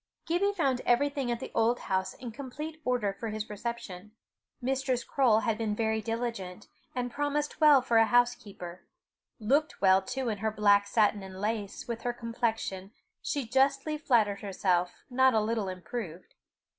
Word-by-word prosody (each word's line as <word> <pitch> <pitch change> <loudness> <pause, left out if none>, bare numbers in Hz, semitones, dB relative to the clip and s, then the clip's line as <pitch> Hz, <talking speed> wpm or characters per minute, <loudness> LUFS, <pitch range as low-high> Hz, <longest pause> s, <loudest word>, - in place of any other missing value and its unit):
Gibbie 360 +5 +1
found 275 -9 +1
everything 275 +1 +1
at 235 -1 -1
the - - -7
Auld 230 +2 +2
Hoose 190 0 -1
in 245 -2 -7
complete 295 +6 -7
order 240 -6 0
for 220 +3 -5
his 215 0 -5
reception: 210 -3 -6 0.5
Mistress 260 -1 -1
Croale 235 -6 +3
had 225 -2 -1
been 215 -2 -1
very 220 0 0
diligent, 225 -5 -4 0.3
and 245 -1 -2
promised 290 +2 -2
well 295 -4 +7
for 235 -3 +2
a 225 0 +6
housekeeper 210 -8 0 0.5
looked 280 +8 +1
well, 190 -1 +5
too, 250 +4 -3
in 210 -2 -3
her 220 +2 0
black 205 -1 +3
satin 210 -1 +2
and 190 -1 -9
lace, 210 -1 -3
with 235 -1 -4
her 245 - -1
complexion, 225 -5 -3 0.3
she 285 -3 -2
justly 275 +5 +2
flattered 225 -9 +2
herself, 185 -3 0
not 260 -1 +4
a - - +5
little 215 -2 -1
improved. 185 -1 -7
230 Hz, 160 wpm, -29 LUFS, 205-260 Hz, 0.5 s, well